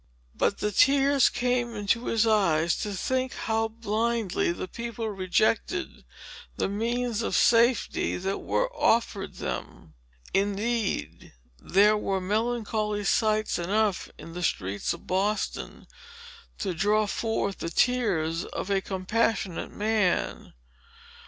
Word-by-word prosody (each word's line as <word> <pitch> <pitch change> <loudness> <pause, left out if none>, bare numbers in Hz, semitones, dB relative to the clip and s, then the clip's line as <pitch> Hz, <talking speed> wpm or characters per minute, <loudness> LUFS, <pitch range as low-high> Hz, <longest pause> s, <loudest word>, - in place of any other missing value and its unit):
But 200 - 0
the 210 - -1
tears 275 +4 +4
came 245 -1 -1
into 210 +3 0
his 230 0 +2
eyes, 170 -7 +3
to 210 - -3
think 255 +6 -1
how 225 0 0
blindly 225 -3 -1
the 175 - -5
people 235 +2 -5
rejected 215 - 0 0.5
the - - 0
means 230 +3 -1
of - - -1
safety, 235 0 +3
that 195 +2 -2
were - - -1
offered 225 -4 +1
them. 80 - -6 0.4
Indeed, 205 +3 -1 0.3
there 205 +3 +4
were 195 -2 -1
melancholy 215 +1 -1
sights 215 0 +1
enough 200 +3 0
in 165 - -10
the 180 - -5
streets 100 - -1
of - - -7
Boston, 200 +3 -2 0.7
to 190 -3 -2
draw 210 +5 +2
forth 205 -1 -2
the 165 - -3
tears 180 -8 +1
of 200 - -5
a 195 -1 +2
compassionate 195 0 -1
man. 210 -3 0
215 Hz, 120 wpm, -27 LUFS, 195-230 Hz, 0.7 s, tears